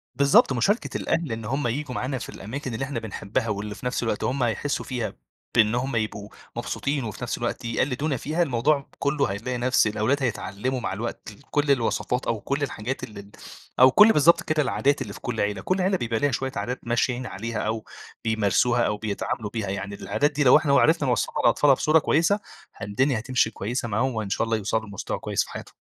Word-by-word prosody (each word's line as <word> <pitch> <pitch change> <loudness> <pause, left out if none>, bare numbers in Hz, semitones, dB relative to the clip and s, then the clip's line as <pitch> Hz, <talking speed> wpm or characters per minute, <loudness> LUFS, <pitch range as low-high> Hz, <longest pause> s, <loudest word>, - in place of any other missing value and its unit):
بالضبط، 140 0 +5
مشاركة 200 - 0
الأهل 165 -7 -1
إن 115 -1 -4
هُم 135 +3 -1
ييجوا 125 +2 -3
معانا 130 +2 -2
في - - -7
الأماكن 125 +5 -6
اللي 110 +4 -2
إحنا 135 -3 -3
بنحبّها 110 +2 -3
واللي 105 0 -3
في 125 - -11
نفس 125 0 -1
الوقت 110 -3 -1
هُم 130 0 0
هيحسّوا 120 +5 -1
فيها 120 -6 -3 0.4
بإن 110 -1 +4
هُم 130 +1 -1
يبقوا 110 -2 -2 0.3
مبسوطين 140 -1 -2
وفي 110 +1 -6
نفس 120 - -2
الوقت 120 0 -3
يقلِّدونا 130 +5 0
فيها، 155 +8 0
الموضوع 140 +1 +1
كلُّه 140 0 +1
هيلاقي 120 +5 -3
نفس 125 -2 +3
الأولاد 110 +7 0
هيتعلموا 125 +1 -2
مع 115 - -3
الوقت 110 +1 -5
ال 105 - -17
كل 145 -1 +2
الوصفات 125 0 0
أو 115 - 0
كل 140 +5 -2
الحاجات 125 -1 -4
ال 110 - -8
ال 100 0 -10 0.5
أو 130 +1 +8
كل 210 - +8
بالضبط 170 +3 +5
كده، 155 -1 +1
العادات 140 +1 +1
اللي - - -5
في - - -10
كل 120 -3 -2
عيلة. 100 -2 -1
كل 185 - 0
عيلة 190 +1 +2
بيبقى 115 -6 -1
ليها 145 -1 +2
شويّة 130 +3 -2
عادات 115 +5 -3
ماشيين 120 +2 0
عليها 115 0 -4
أو 110 0 -2 0.4
بيمارسوها 110 +2 +2
أو 105 - -1
بيتعاملوا 105 +1 -3
بيها، 110 -2 -3
يعني 100 +1 -4
العادات 145 +8 0
دي 145 0 0
لو 130 +2 +8
إحنا 150 -2 +1
وعرفنا 150 0 +4
نوصّلها 125 - 0
للأطفال 135 +4 +5
بصورة 155 +4 +4
كويسة 165 +7 +2 0.4
ه - - -8
الدنيا 130 +4 +1
هتمشي 125 0 +1
كويسة 120 +4 -3
معاهم 120 +5 0
وإن 110 -2 -3
شاء 100 - 0
الله 115 0 0
يوصلوا 110 +2 -1
لمستوى 100 -2 -4
كويّس - - 0
في - - -13
حياتهم. - - -9
125 Hz, 205 wpm, -25 LUFS, 110-140 Hz, 0.5 s, أو